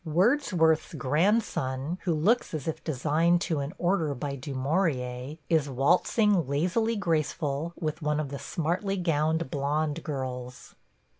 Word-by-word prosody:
Wordsworth's 170 - +2
grandson, 155 - 0
who 175 - +2
looks 200 +4 +2
as 150 -1 -5
if 160 - -3
designed 160 +4 +2
to 160 -4 -1
an 140 +1 -3
order 170 -5 +1
by 140 +2 -4
Du 135 +1 -6
Maurier, 130 -2 -1
is 155 -4 +2
waltzing, 180 - +2
lazily 185 - +1
graceful, 160 -4 -1
with 155 0 -3
one 150 0 0
of 150 -3 -2
the 140 0 -6
smartly 175 +7 -2
gowned 160 -2 0
blond 150 +2 -1
girls. 125 -4 -5
155 Hz, 135 wpm, -28 LUFS, 140-175 Hz, -, Wordsworth's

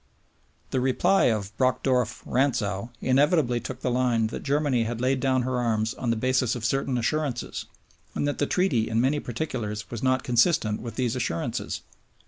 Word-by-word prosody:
The 130 - +1
reply 135 +9 +3
of 110 -2 0
Brockdorff 130 -1 +1
Rantzau 115 -5 0
inevitably 135 -1 +3
took 130 +1 -7
the 125 - 0
line 120 -2 +2
that - - -4
Germany 140 -4 +1
had 115 0 -3
laid 130 +2 +1
down 130 -1 +1
her 130 0 -1
arms 110 -1 0
on 120 - -3
the 115 - +2
basis 130 +1 +1
of 115 -3 -4
certain 135 +2 0
assurances, 135 +2 -2 0.5
and 145 - 0
that 145 - -2
the 145 - +1
Treaty 140 -13 +1
in 115 0 +1
many 135 +5 +2
particulars 115 -6 -4
was 115 - -5
not 130 0 +2
consistent 120 -3 +2
with 115 -2 -7
these 125 -1 0
assurances. 115 -10 -2
125 Hz, 170 wpm, -26 LUFS, 115-135 Hz, 0.5 s, reply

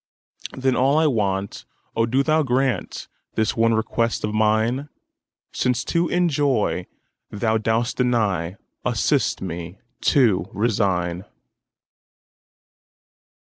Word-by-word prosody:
Then 130 -1 +1
all 135 +3 +3
I 160 - +4
want—O 105 -1 -2
do 130 +4 +2
Thou 155 +2 +2
grantThis 125 -4 -2
one 115 0 +3
request 115 +1 -1
of 105 - -2
mine!—Since 115 +2 -2
to 170 0 0
enjoy 145 - +1 0.4
Thou 110 +1 0
dost 115 +2 0
deny, 105 -9 0 0.3
Assist - - 0
me 85 0 -6 0.3
to 110 - +3
resign. 95 -5 0
115 Hz, 90 wpm, -22 LUFS, 100-130 Hz, 0.4 s, I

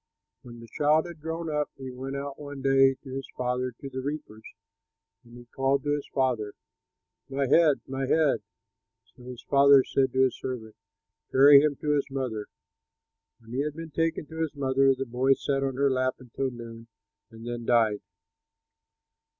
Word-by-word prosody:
When 120 -1 -12
the 115 - -12
child 150 +5 +2
had 170 -3 -10
grown 165 +1 -4
up 150 -1 -1
he 130 -1 -7
went 135 +2 -6
out 140 0 -6
one 145 -2 -8
day 135 0 +4
to 135 - -11
his 135 0 -6
father 125 0 -1
to 140 - -7
the 130 -1 -5
reapers. 135 -6 -6 0.8
And 120 0 -15
he 120 - -13
called 135 +2 0
to 145 - -1
his 145 -1 -3
father, 120 -6 0 0.8
"My 135 +1 -1
head, 150 +1 +4
my 135 0 -3
head!" 155 -1 +2 0.7
So - - -18
his 125 -1 -10
father 140 -1 +6
said 130 -1 0
to 130 0 +4
his 130 - 0
servant, 115 -4 -6 0.6
"Carry 140 +1 +8
him 150 -1 +1
to 150 - 0
his 145 -1 +1
mother." 125 -6 -4 0.9
When 115 0 -15
he 130 - 0
had 150 0 -3
been 165 0 -8
taken 165 0 -1
to 160 +2 -7
his 155 -2 -2
mother, 135 -1 +2
the 135 +1 -4
boy 130 +2 +2
sat 135 0 -1
on 135 -1 -2
her 140 +1 +2
lap 130 0 0
until 130 +1 -4
noon 115 -2 -10 0.4
and 115 0 -12
then 120 0 -5
died. 110 -4 +2
135 Hz, 180 wpm, -27 LUFS, 125-145 Hz, 0.9 s, Carry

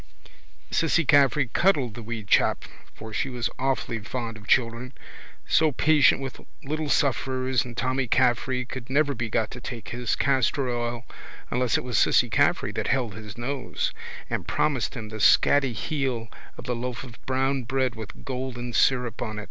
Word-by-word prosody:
Cissy 165 0 +2
Caffrey 140 -1 +4
cuddled 140 - +2
the 120 - -8
wee 115 0 -5
chap 100 - +2 0.3
for 110 0 -9
she 135 - -1
was 125 -2 -2
awfully 130 -3 -1
fond 115 +1 -5
of 110 -1 -13
children, 125 +1 +1 0.5
so 155 -1 +4
patient 150 0 +4
with 135 -2 -6 0.2
little 155 +2 -3
sufferers 130 -2 +1
and 120 -1 -10
Tommy 130 +1 0
Caffrey 125 +1 +2
could 125 -1 -8
never 145 +1 +2
be 115 -2 -4
got 110 0 0
to 125 - -8
take 115 -5 -7
his 120 -2 -1
castor 135 0 +1
oil 120 0 -3 0.5
unless 125 -1 +2
it - - -3
was 125 -3 0
Cissy - - +3
Caffrey - - +2
that - - -3
held 125 -5 0
his 105 0 -9
nose 130 +2 -3 0.3
and - - -3
promised 130 -8 0
him 110 -4 -6
the 110 0 -7
scatty 135 +4 +4
heel 130 -4 -2 0.3
of - - -8
the 125 -2 -2
loaf 125 +1 -4
or 130 - -10 0.2
brown 135 +1 +1
bread 130 +1 0
with 110 -5 -9
golden 125 -2 -4
syrup 125 -1 +2
on. 110 -3 -3
125 Hz, 170 wpm, -26 LUFS, 115-135 Hz, 0.5 s, Caffrey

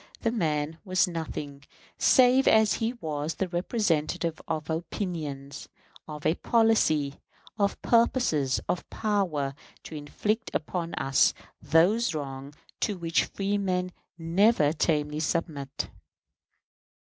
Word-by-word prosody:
The 230 - +1
man 160 -6 -1
was 185 -1 +2
nothing, 150 -4 -5 0.4
save 255 0 +5
as 220 -1 +5
he 230 +1 -1
was 155 -8 -4
the 190 - -1
representative 175 -3 -1
of 155 -1 -3
opinions, 155 -5 -4 0.4
of 150 -1 -8
a - - +4
policy, 180 -11 +2 0.4
of 200 -1 +1
purposes, 230 - +2
of 180 - -2
power, 180 -10 -1 0.3
to - - -10
inflict 210 +10 -2
upon 170 +2 -3
us 135 0 +3 0.3
those 170 +8 +3
wrongs 140 -1 -6 0.2
to 205 -3 -1
which 165 -1 +1
freemen 195 -2 -1 0.3
never 165 -1 +3
tamely 150 -2 0
submit. 150 -3 -2
165 Hz, 110 wpm, -27 LUFS, 150-205 Hz, 0.4 s, save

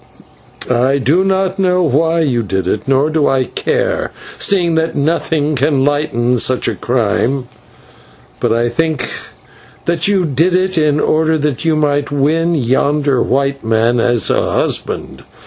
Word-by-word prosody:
"I 125 +3 +2
do 145 +8 +2
not 190 0 0
know 180 -1 +2
why 165 +3 +1
you 130 -7 0
did 95 -3 -2
it, 105 - -2
nor 135 +3 +2
do 155 -2 +1
I 135 -1 +2
care, - - -2 0.3
seeing 180 -4 +2
that 160 0 -1
nothing 155 0 0
can 135 0 +1
lighten 125 -5 0
such 130 +3 0
a - - 0
crime; 125 +2 -1 0.9
but - - 0
I 115 +1 +1
think 155 +3 -1 0.8
that 170 0 +1
you 195 -3 +1
did 160 +5 +1
it 185 0 0
in 150 -2 +2
order 160 +1 +1
that 150 0 -2
you 160 -1 +2
might 145 -1 0
win 160 +4 +1
yonder 140 +1 +1
white 140 +1 -1
man 115 +2 +1
as 120 -2 +1
a - - 0
husband. - - -2
145 Hz, 150 wpm, -15 LUFS, 130-165 Hz, 0.9 s, I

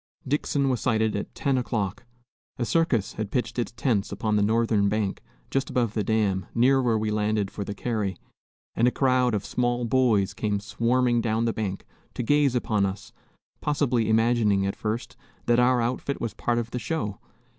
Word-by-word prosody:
Dixon 140 0 0
was 130 -3 0
sighted 110 -3 +1
at 100 - -5
10 135 -2 +1
o'clock. 110 -4 -3 0.5
A 120 - -1
circus 130 - +1
had 105 -2 -4
pitched 125 +2 -2
its 120 - -2
tents 115 -4 0
upon 105 +2 -1
the 105 - +3
northern 110 -1 +2
bank, 105 -2 -1 0.3
just 135 - 0
above 120 -4 0
the 110 - 0
dam, 100 -3 0
near 130 +3 +4
where 120 -3 +2
we 110 0 -1
landed 105 -1 0
for 100 - -4
the 100 +1 -6
carry, 105 -5 -2 0.6
and 120 - +3
a - - +6
crowd 125 -2 +2
of 100 - -3
small 120 0 0
boys 115 -6 +2
came 105 -2 -1
swarming 120 +3 +1
down 115 0 0
the 115 - 0
bank 100 -3 -4 0.3
to - - -2
gaze 145 0 +3
upon 110 -4 +1
us, 100 +1 -4 0.5
possibly 130 -6 +1
imagining, 110 -3 +3
at 100 - -2
first, 110 +3 -4 0.3
that 120 0 +3
our 125 0 +4
outfit 125 +4 -2
was 115 - -3
a - - -39
part 120 -1 0
of 115 -1 -2
the 125 - -3
show. 120 - -3
115 Hz, 190 wpm, -26 LUFS, 105-125 Hz, 0.6 s, a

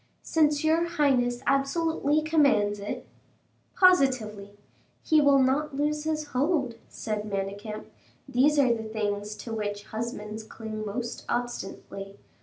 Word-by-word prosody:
"Since 300 -2 +2
your 320 +2 +3
highness 255 -7 +1
absolutely 295 +2 +1
commands 280 -10 +3
it." 200 - -5 0.7
"Positively." 235 - +3 0.5
"He 310 -1 +4
will 285 -1 +5
not 270 +2 +2
lose 300 +1 0
his 310 -1 -2
hold," 275 -1 +1 0.2
said 215 -1 -4
Manicamp; 200 +2 -4 0.4
"these 275 +3 +3
are 260 -4 +5
the 225 - -3
things 210 -1 -2
to 230 - -7
which 205 -2 -3
husbands 220 -1 -5
cling 220 0 -7
most 235 +3 -4
obstinately. 200 -4 -4
245 Hz, 120 wpm, -27 LUFS, 210-295 Hz, 0.7 s, will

